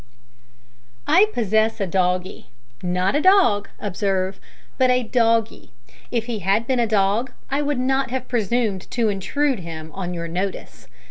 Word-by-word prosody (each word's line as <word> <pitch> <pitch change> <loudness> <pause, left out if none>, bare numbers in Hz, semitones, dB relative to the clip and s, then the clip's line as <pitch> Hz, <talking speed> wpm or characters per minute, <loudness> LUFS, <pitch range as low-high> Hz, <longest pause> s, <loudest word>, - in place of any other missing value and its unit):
I 385 +6 +5
possess 220 - +1
a 195 - 0
doggie 180 0 -1 0.3
not 180 +5 0
a 295 - +2
dog, 365 - +4
observe, 190 -1 -2 0.4
but 260 -1 +4
a 250 0 +3
doggie. 230 -1 0 0.4
If 230 -2 -1
he 235 -3 -3
had 200 +4 +1
been 255 0 0
a 235 - +2
dog 210 +4 +1 0.2
I 280 +2 +1
would 290 -1 -1
not 265 +1 0
have 255 0 -3
presumed 225 -4 -1
to 230 -3 +1
intrude 255 +6 0
him 160 -2 -8
on 180 -2 -4
your 170 0 -4
notice. 185 +4 -5
220 Hz, 150 wpm, -22 LUFS, 190-250 Hz, 0.4 s, I